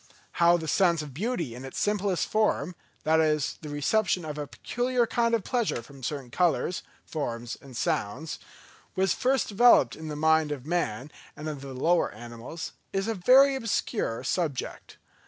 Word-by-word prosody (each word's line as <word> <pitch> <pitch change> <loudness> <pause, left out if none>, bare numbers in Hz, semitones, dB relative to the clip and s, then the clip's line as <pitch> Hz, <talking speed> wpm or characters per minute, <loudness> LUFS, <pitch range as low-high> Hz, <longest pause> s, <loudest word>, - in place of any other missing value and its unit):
How 170 +1 +6
the 160 -1 -6
sense 170 -2 +3
of 145 -3 -9
beauty 170 - -2
in 125 +2 -9
its 135 - -8
simplest 205 -3 0
form—that 170 -5 0
is, 155 -2 +1
the 155 - -7
reception 175 +5 +1
of 150 -1 -5
a 145 - -4
peculiar 245 - 0
kind 230 0 +1
of 220 - -2
pleasure 230 - -1
from 135 +3 -14
certain 135 -1 -4
colours, 175 +1 +1 0.2
forms 120 -6 -4
and 130 -4 -10
sounds—was 160 - -3
first 260 0 +1
developed 205 - +5
in 160 - -8
the 150 - -4
mind 160 0 +3
of 140 -3 -5
man 150 -6 -2 0.3
and 150 - -6
of 150 -3 -5
the 135 -1 -8
lower 170 +7 +2
animals, 120 - -8 0.2
is 195 +1 -1
a 225 - 0
very 260 +8 +6
obscure 230 - -1
subject. 160 -8 -3
160 Hz, 160 wpm, -27 LUFS, 140-200 Hz, 0.3 s, How